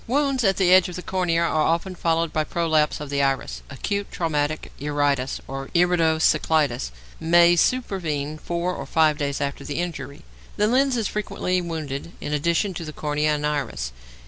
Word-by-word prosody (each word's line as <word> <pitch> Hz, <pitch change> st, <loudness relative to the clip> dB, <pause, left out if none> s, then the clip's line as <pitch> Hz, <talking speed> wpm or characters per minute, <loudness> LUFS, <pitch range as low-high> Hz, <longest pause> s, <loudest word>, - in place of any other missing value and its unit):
Wounds 275 Hz, 0 st, +1 dB
at 195 Hz, -2 st, +3 dB
the 185 Hz, -2 st, +4 dB
edge 185 Hz, 0 st, +6 dB
of 180 Hz, -, -7 dB
the 180 Hz, -, -6 dB
cornea 175 Hz, -3 st, 0 dB
are 160 Hz, -2 st, +1 dB
often 170 Hz, +4 st, 0 dB
followed 165 Hz, -2 st, 0 dB
by 155 Hz, -, +1 dB
prolapse 155 Hz, -2 st, +1 dB
of 150 Hz, -1 st, -7 dB
the 140 Hz, 0 st, +1 dB
iris. 135 Hz, -1 st, -1 dB
Acute 200 Hz, +8 st, -3 dB
traumatic 155 Hz, -2 st, -1 dB
iritis 145 Hz, -2 st, 0 dB
or 135 Hz, 0 st, -5 dB
irido 170 Hz, -2 st, +3 dB
cyclitis 155 Hz, -, +2 dB, 0.3 s
may 170 Hz, +1 st, +5 dB
supervene 165 Hz, -, 0 dB
four 175 Hz, +2 st, -2 dB
or 140 Hz, -5 st, -6 dB
five 155 Hz, 0 st, +3 dB
days 140 Hz, -1 st, -1 dB
after 140 Hz, -1 st, -3 dB
the 145 Hz, -, -5 dB
injury. 170 Hz, -4 st, -5 dB, 0.3 s
The 210 Hz, -, +3 dB
lens 255 Hz, +3 st, +2 dB
is 220 Hz, -3 st, 0 dB
frequently 185 Hz, -3 st, -1 dB
wounded 160 Hz, -2 st, -5 dB
in 150 Hz, -, -4 dB
addition 170 Hz, +6 st, +1 dB
to 170 Hz, -, -5 dB
the 155 Hz, -1 st, -7 dB
cornea 150 Hz, +1 st, 0 dB
and 150 Hz, 0 st, -3 dB
iris. 135 Hz, -, -2 dB
160 Hz, 175 wpm, -23 LUFS, 145-180 Hz, 0.3 s, edge